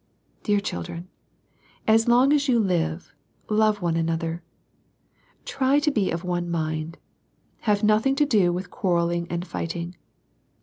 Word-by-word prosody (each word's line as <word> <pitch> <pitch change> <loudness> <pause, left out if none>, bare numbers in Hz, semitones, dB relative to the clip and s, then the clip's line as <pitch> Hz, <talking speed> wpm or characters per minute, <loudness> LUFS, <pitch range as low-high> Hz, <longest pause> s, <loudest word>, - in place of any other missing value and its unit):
Dear 205 -2 +2
children, 170 - -6 0.8
as 225 +1 +4
long 250 +4 +5
as 290 -1 +2
you 250 -3 +3
live, 165 -6 -1 0.4
love 215 -2 +2
one 170 -1 +1
another. 165 0 -1 1.0
Try 270 +1 +1
to 295 +1 +2
be 210 -8 +1
of 170 +1 -3
one 175 -1 -2
mind. 160 -1 -3 0.7
Have 205 0 +2
nothing 215 +6 +3
to 295 +1 +3
do 205 -10 +3
with 180 +2 -4
quarrelling 170 -4 0
and 175 +1 -3
fighting. 170 0 -5
180 Hz, 135 wpm, -24 LUFS, 170-220 Hz, 1.0 s, long